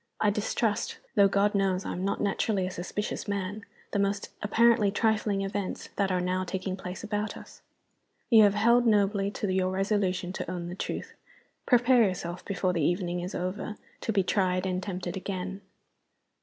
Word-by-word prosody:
I 210 Hz, -, +3 dB
distrust 210 Hz, +1 st, -1 dB, 0.2 s
though 200 Hz, -1 st, +6 dB
God 200 Hz, +1 st, +2 dB
knows 195 Hz, -2 st, +1 dB
I -, -, -3 dB
am 180 Hz, -, -4 dB
not 200 Hz, -, -1 dB
naturally 200 Hz, -1 st, 0 dB
a 185 Hz, -, -3 dB
suspicious 185 Hz, +5 st, -4 dB
man 205 Hz, +1 st, -3 dB, 0.3 s
the 205 Hz, -, 0 dB
most 200 Hz, 0 st, 0 dB
apparently 225 Hz, 0 st, +4 dB
trifling 210 Hz, -1 st, +1 dB
events 195 Hz, -1 st, -4 dB
that 195 Hz, -1 st, +1 dB
are 180 Hz, -, +1 dB
now 185 Hz, +1 st, 0 dB
taking 185 Hz, +1 st, -3 dB
place 185 Hz, +1 st, -7 dB
about 210 Hz, -1 st, -2 dB
us. -, -, -13 dB, 0.7 s
You 225 Hz, -2 st, +9 dB
have 205 Hz, -1 st, +5 dB
held 235 Hz, +3 st, +4 dB
nobly 200 Hz, -2 st, +3 dB
to 205 Hz, -1 st, -2 dB
your 185 Hz, 0 st, +1 dB
resolution 190 Hz, -2 st, 0 dB
to -, -, -4 dB
own 175 Hz, -1 st, -4 dB
the 180 Hz, -, -6 dB
truth. -, -, -4 dB, 0.5 s
Prepare 245 Hz, 0 st, +5 dB
yourself, 180 Hz, -3 st, -2 dB
before 185 Hz, -2 st, 0 dB
the 170 Hz, -, 0 dB
evening 175 Hz, +2 st, 0 dB
is 180 Hz, +2 st, -5 dB
over, 185 Hz, +4 st, -3 dB, 0.2 s
to -, -, -2 dB
be 200 Hz, -3 st, +2 dB
tried 185 Hz, -1 st, +1 dB
and 185 Hz, -1 st, -1 dB
tempted 180 Hz, -2 st, -4 dB
again." 190 Hz, 0 st, -4 dB
195 Hz, 175 wpm, -28 LUFS, 185-210 Hz, 0.7 s, You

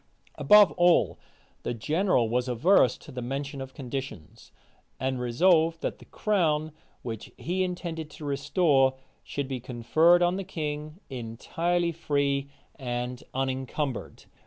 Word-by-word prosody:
Above 210 Hz, -2 st, +6 dB
all, 175 Hz, -1 st, +4 dB, 0.4 s
the 120 Hz, -, -3 dB
general 155 Hz, -, +1 dB
was 125 Hz, +3 st, 0 dB
averse 130 Hz, -, +4 dB
to -, -, -13 dB
the 125 Hz, -, -5 dB
mention 135 Hz, +2 st, -4 dB
of 135 Hz, 0 st, -8 dB
conditions; 130 Hz, -, -7 dB, 0.5 s
and 130 Hz, 0 st, -1 dB
resolved, 165 Hz, +6 st, +3 dB
that -, -, -3 dB
the -, -, -14 dB
crown, 160 Hz, -7 st, 0 dB, 0.3 s
which 115 Hz, -3 st, -6 dB
he 180 Hz, +3 st, -2 dB
intended 170 Hz, -3 st, -4 dB
to 150 Hz, -, -10 dB
restore, 140 Hz, -1 st, +2 dB, 0.3 s
should 140 Hz, -1 st, -4 dB
be 130 Hz, -1 st, -4 dB
conferred 130 Hz, +9 st, +3 dB
on 175 Hz, +1 st, +2 dB
the 195 Hz, -, -3 dB
king 155 Hz, -2 st, -5 dB
entirely 165 Hz, +9 st, -1 dB
free 140 Hz, -3 st, -1 dB, 0.3 s
and 125 Hz, -1 st, -3 dB
unencumbered. 130 Hz, 0 st, -3 dB
140 Hz, 130 wpm, -27 LUFS, 130-170 Hz, 0.5 s, Above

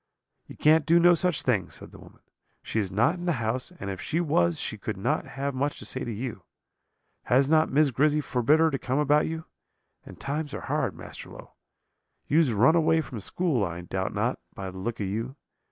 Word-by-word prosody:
"'You -, -, -12 dB
can't 155 Hz, 0 st, +4 dB
do 170 Hz, +1 st, +6 dB
no 175 Hz, +1 st, +6 dB
such 175 Hz, -2 st, +1 dB
thing,' 105 Hz, -8 st, +1 dB
said -, -, -11 dB
the -, -, -13 dB
woman; -, -, -16 dB, 0.4 s
'she 110 Hz, -, -2 dB
is 100 Hz, -3 st, -2 dB
not 110 Hz, -, +3 dB
in 175 Hz, -, -6 dB
the 175 Hz, -, +3 dB
house, 120 Hz, +3 st, -2 dB
and 100 Hz, -, -4 dB
if 95 Hz, -, -6 dB
she 160 Hz, -, -1 dB
was 85 Hz, -, +1 dB
she -, -, -3 dB
could -, -, -5 dB
not -, -, -1 dB
have 140 Hz, +1 st, -4 dB
much 140 Hz, +3 st, -1 dB
to -, -, -9 dB
say 130 Hz, -, -3 dB
to 120 Hz, -, -4 dB
you. 115 Hz, -2 st, -5 dB, 0.8 s
Has 135 Hz, +2 st, +3 dB
not 155 Hz, +1 st, +3 dB
Miss 145 Hz, +1 st, +3 dB
Grizzy 150 Hz, +5 st, +2 dB
forbid 140 Hz, +1 st, +2 dB
her 160 Hz, 0 st, +4 dB
to 135 Hz, -, -2 dB
come 130 Hz, +1 st, -2 dB
about 150 Hz, 0 st, +3 dB
you? 160 Hz, 0 st, -5 dB, 0.6 s
and -, -, -13 dB
times 145 Hz, +1 st, -3 dB
are -, -, -5 dB
hard, -, -, -1 dB
Master -, -, -9 dB
Low. -, -, -12 dB, 0.8 s
You 150 Hz, -, +2 dB
has 155 Hz, -7 st, +3 dB
run 120 Hz, +9 st, +4 dB
away 160 Hz, -1 st, +3 dB
from 125 Hz, -7 st, -7 dB
school, 140 Hz, -, 0 dB
I 85 Hz, -2 st, -4 dB
doubt 95 Hz, +2 st, -3 dB
not, -, -, 0 dB, 0.2 s
by 95 Hz, -1 st, -5 dB
the 95 Hz, -, -9 dB
look 115 Hz, +4 st, -4 dB
of 100 Hz, -, -1 dB
you. 115 Hz, +7 st, -3 dB
135 Hz, 220 wpm, -27 LUFS, 110-155 Hz, 0.8 s, do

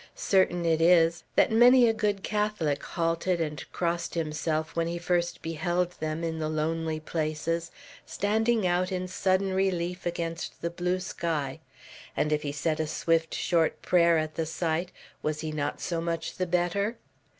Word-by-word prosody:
Certain 180 Hz, -3 st, +2 dB
it 165 Hz, -1 st, +2 dB
is, 165 Hz, -1 st, +4 dB
that -, -, +4 dB
many 245 Hz, +2 st, +7 dB
a 225 Hz, -, +3 dB
good 205 Hz, -3 st, -1 dB
Catholic 210 Hz, -9 st, 0 dB
halted 170 Hz, +1 st, -1 dB
and 150 Hz, -3 st, -3 dB
crossed 170 Hz, 0 st, -2 dB
himself 155 Hz, 0 st, -2 dB
when 165 Hz, 0 st, +1 dB
he 170 Hz, +1 st, -3 dB
first 175 Hz, 0 st, -1 dB
beheld 175 Hz, +2 st, -1 dB
them, 155 Hz, +1 st, -3 dB
in 160 Hz, -1 st, -2 dB
the 155 Hz, -1 st, -1 dB
lonely 160 Hz, +1 st, -1 dB
places, 160 Hz, +1 st, -2 dB, 0.3 s
standing 220 Hz, +1 st, +1 dB
out 180 Hz, +1 st, +1 dB
in 185 Hz, -1 st, -2 dB
sudden 190 Hz, +1 st, +1 dB
relief 180 Hz, -2 st, -1 dB
against 170 Hz, -1 st, -4 dB
the 170 Hz, -, -1 dB
blue 180 Hz, +1 st, -1 dB
sky; 160 Hz, -7 st, -3 dB, 0.6 s
and 150 Hz, 0 st, +1 dB
if 150 Hz, -, +1 dB
he 145 Hz, -2 st, -3 dB
said 155 Hz, +2 st, -1 dB
a 155 Hz, -, 0 dB
swift 165 Hz, +1 st, 0 dB
short 165 Hz, -3 st, +1 dB
prayer 170 Hz, -2 st, +4 dB
at 155 Hz, 0 st, -1 dB
the 165 Hz, -1 st, -2 dB
sight, 165 Hz, +2 st, -1 dB, 0.3 s
was 155 Hz, 0 st, -2 dB
he 155 Hz, -, -3 dB
not 150 Hz, -2 st, -2 dB
so 170 Hz, -2 st, -2 dB
much 165 Hz, -1 st, -3 dB
the 185 Hz, -, -1 dB
better? 180 Hz, +6 st, 0 dB
170 Hz, 165 wpm, -28 LUFS, 160-180 Hz, 0.6 s, many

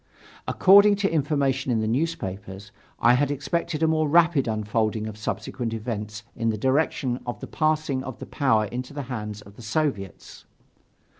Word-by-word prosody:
According 200 Hz, +2 st, +6 dB
to 200 Hz, 0 st, 0 dB
information 140 Hz, -4 st, +1 dB
in 115 Hz, -, +2 dB
the 110 Hz, -, -1 dB
newspapers, 105 Hz, -, -3 dB, 0.3 s
I 120 Hz, -, +5 dB
had 140 Hz, +3 st, +2 dB
expected 155 Hz, +3 st, -2 dB
a -, -, +4 dB
more 155 Hz, -1 st, +1 dB
rapid 165 Hz, -4 st, +4 dB
unfolding 110 Hz, 0 st, -1 dB
of 110 Hz, -1 st, -6 dB
subsequent 115 Hz, +2 st, -4 dB
events 105 Hz, -1 st, -5 dB
in 115 Hz, -1 st, 0 dB
the 110 Hz, -, -1 dB
direction 130 Hz, 0 st, 0 dB
of 120 Hz, -, -4 dB
the -, -, -6 dB
passing 155 Hz, -4 st, 0 dB
of 130 Hz, -3 st, -7 dB
the -, -, -8 dB
power 120 Hz, -7 st, +2 dB
into 125 Hz, +6 st, -6 dB
the 145 Hz, -, -3 dB
hands 105 Hz, -2 st, -5 dB
of 100 Hz, +1 st, -16 dB
the -, -, -11 dB
Soviets. 110 Hz, -, -3 dB
125 Hz, 165 wpm, -25 LUFS, 110-155 Hz, 0.3 s, According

